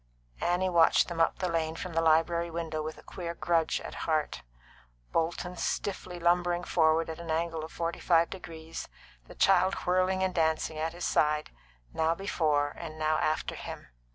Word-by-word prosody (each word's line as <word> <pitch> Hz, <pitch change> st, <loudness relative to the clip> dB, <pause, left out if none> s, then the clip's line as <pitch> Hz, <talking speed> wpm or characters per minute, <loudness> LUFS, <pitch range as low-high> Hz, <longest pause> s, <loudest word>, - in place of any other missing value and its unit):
Annie 180 Hz, +2 st, +1 dB
watched 170 Hz, -1 st, +4 dB
them 170 Hz, -1 st, -1 dB
up 165 Hz, -, +2 dB
the 185 Hz, -, -1 dB
lane 165 Hz, -2 st, -1 dB
from 175 Hz, +1 st, -6 dB
the 165 Hz, -, +2 dB
library 165 Hz, +1 st, +3 dB
window 165 Hz, -2 st, -3 dB
with 155 Hz, 0 st, -5 dB
a -, -, -14 dB
queer 170 Hz, -2 st, -6 dB
grudge 165 Hz, -2 st, +1 dB
at -, -, -7 dB, 0.2 s
heart; 155 Hz, -1 st, 0 dB, 0.7 s
Bolton 170 Hz, +2 st, -1 dB
stiffly 185 Hz, 0 st, -3 dB
lumbering 175 Hz, 0 st, +2 dB
forward 160 Hz, -1 st, +3 dB
at 160 Hz, 0 st, -6 dB
an 170 Hz, -1 st, -8 dB
angle 165 Hz, 0 st, -1 dB
of 160 Hz, -, -8 dB
forty 170 Hz, 0 st, -3 dB
five 170 Hz, -1 st, +3 dB
degrees, 165 Hz, -3 st, -8 dB, 0.4 s
the -, -, -12 dB
child 190 Hz, +1 st, +4 dB
whirling 185 Hz, +1 st, +2 dB
and 190 Hz, -1 st, 0 dB
dancing 160 Hz, -1 st, 0 dB
at 160 Hz, +1 st, -1 dB
his 175 Hz, 0 st, -4 dB
side, 150 Hz, 0 st, +2 dB, 0.4 s
and -, -, -26 dB
now 160 Hz, +1 st, +2 dB
before 155 Hz, -7 st, +1 dB
and 155 Hz, -2 st, -8 dB
now 155 Hz, 0 st, +1 dB
after 155 Hz, -, 0 dB
him. -, -, -8 dB
165 Hz, 180 wpm, -29 LUFS, 160-175 Hz, 0.7 s, watched